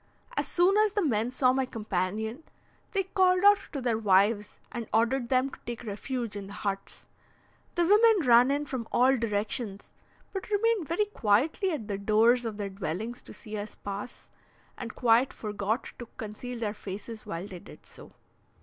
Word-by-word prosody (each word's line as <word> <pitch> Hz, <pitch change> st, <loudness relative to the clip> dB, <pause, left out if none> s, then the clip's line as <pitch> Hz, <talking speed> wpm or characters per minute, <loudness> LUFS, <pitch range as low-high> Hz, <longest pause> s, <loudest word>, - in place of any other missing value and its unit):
As -, -, 0 dB
soon 360 Hz, +3 st, +3 dB
as 425 Hz, -1 st, +3 dB
the 410 Hz, -4 st, +1 dB
men 225 Hz, -4 st, +1 dB
saw 255 Hz, 0 st, +3 dB
my 265 Hz, 0 st, 0 dB
companion, 215 Hz, -, -3 dB, 0.5 s
they 390 Hz, -2 st, +1 dB
called 370 Hz, -1 st, +2 dB
out 410 Hz, 0 st, +7 dB
to 280 Hz, -, -3 dB
their 240 Hz, -3 st, 0 dB
wives, 205 Hz, +1 st, +2 dB
and 235 Hz, -3 st, -5 dB
ordered 235 Hz, +2 st, +1 dB
them 260 Hz, +1 st, +2 dB
to -, -, -11 dB
take 240 Hz, 0 st, -5 dB
refuge 230 Hz, +1 st, -4 dB
in 200 Hz, -1 st, -6 dB
the 200 Hz, -, -9 dB
huts. 200 Hz, -2 st, -5 dB, 0.7 s
The 345 Hz, -, +3 dB
women 415 Hz, -, +5 dB
ran 240 Hz, +2 st, +7 dB
in 290 Hz, +1 st, 0 dB
from 255 Hz, -5 st, -4 dB
all 255 Hz, +2 st, +4 dB
directions, 210 Hz, -2 st, -3 dB, 0.4 s
but 385 Hz, 0 st, -5 dB
remained 420 Hz, -4 st, +1 dB
very 350 Hz, +6 st, +1 dB
quietly 300 Hz, -, +1 dB
at 290 Hz, -, -3 dB
the 200 Hz, -2 st, -3 dB
doors 225 Hz, +4 st, +4 dB
of 220 Hz, -2 st, -4 dB
their 205 Hz, -1 st, -3 dB
dwellings 195 Hz, +5 st, -4 dB
to -, -, -10 dB
see 215 Hz, -1 st, -9 dB
us 210 Hz, +1 st, -7 dB
pass, 205 Hz, +5 st, -7 dB, 0.4 s
and 235 Hz, -2 st, -7 dB
quite 240 Hz, +2 st, +4 dB
forgot 210 Hz, +2 st, -3 dB
to 240 Hz, -, -7 dB
conceal 225 Hz, +3 st, -6 dB
their 215 Hz, -3 st, -2 dB
faces 210 Hz, +2 st, -8 dB
while 170 Hz, -1 st, -4 dB
they 185 Hz, -3 st, -9 dB
did -, -, -15 dB
so. -, -, -12 dB
235 Hz, 175 wpm, -28 LUFS, 210-275 Hz, 0.7 s, out